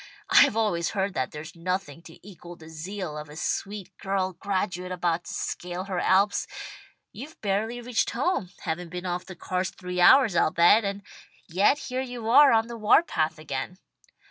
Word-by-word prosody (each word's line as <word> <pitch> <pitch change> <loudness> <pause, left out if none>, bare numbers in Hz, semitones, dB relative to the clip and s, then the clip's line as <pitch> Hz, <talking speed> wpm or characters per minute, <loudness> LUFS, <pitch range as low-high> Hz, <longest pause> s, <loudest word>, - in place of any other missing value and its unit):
I've 220 - +6
always 175 -7 +1
heard 195 0 0
that 130 -5 -1
there's 150 +3 -9
nothing 170 -3 -3
to 160 - -15
equal 175 -2 -11
the 160 -1 -14
zeal 170 +1 -6
of 150 0 -9
a 150 - -11
sweet 200 +4 -4
girl 190 -1 -1
graduate 185 -1 -3
about 175 -1 -1
to - - -7
scale 180 +1 -4
her 190 -2 -3
Alps. 195 +3 +2 0.6
You've 275 +8 -10
barely 215 +4 -1
reached 240 -1 0
home, 250 - -1
haven't 170 +2 -4
been 180 +1 -6
off 180 0 -3
the 185 - -9
cars 185 +1 -2
three 180 -1 -4
hours, 250 0 +6
I'll 165 - +3
bet, 175 +7 +5
and 200 0 -4 0.4
yet 195 - +3
here 255 -3 -4
you 245 -3 -6
are 285 +2 +8
on 225 0 +3
the 235 0 -8
war 215 +9 +5
path 160 - -1
again. 155 +3 -5
185 Hz, 180 wpm, -26 LUFS, 170-210 Hz, 0.6 s, are